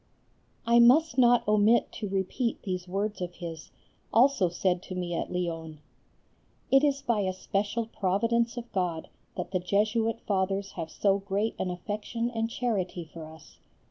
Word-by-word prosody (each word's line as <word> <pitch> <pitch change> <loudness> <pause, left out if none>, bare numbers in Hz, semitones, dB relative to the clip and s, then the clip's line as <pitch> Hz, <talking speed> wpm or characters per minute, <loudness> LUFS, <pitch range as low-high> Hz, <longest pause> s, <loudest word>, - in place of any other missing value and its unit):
I 235 +1 +5
must 260 +4 +5
not 245 -2 +5
omit 215 +2 +4
to 210 - -5
repeat 195 +5 -2
these 185 -2 -3
words 200 +2 -2
of 175 0 -4
his, 165 -3 -7 0.4
also 235 -6 +4
said 180 +1 0
to 185 - -8
me 175 -1 -3
at - - -3
Lyons: 165 -3 -3 0.9
"It 270 +1 +6
is 280 -2 +1
by 235 -3 +1
a 190 -2 0
special 205 +4 -2
providence 230 +4 0
of 240 0 -7
God 175 -4 -2 0.3
that - - -4
the 185 - +1
Jesuit 215 +5 +1
Fathers 195 0 -1
have 165 -2 -5
so 200 +3 +1
great 200 +3 -1
an 185 - -1
affection 215 +6 -3
and 225 -1 -1
charity 190 -8 -2
for 160 -2 -8
us. 160 -1 -15
200 Hz, 160 wpm, -28 LUFS, 180-230 Hz, 0.9 s, It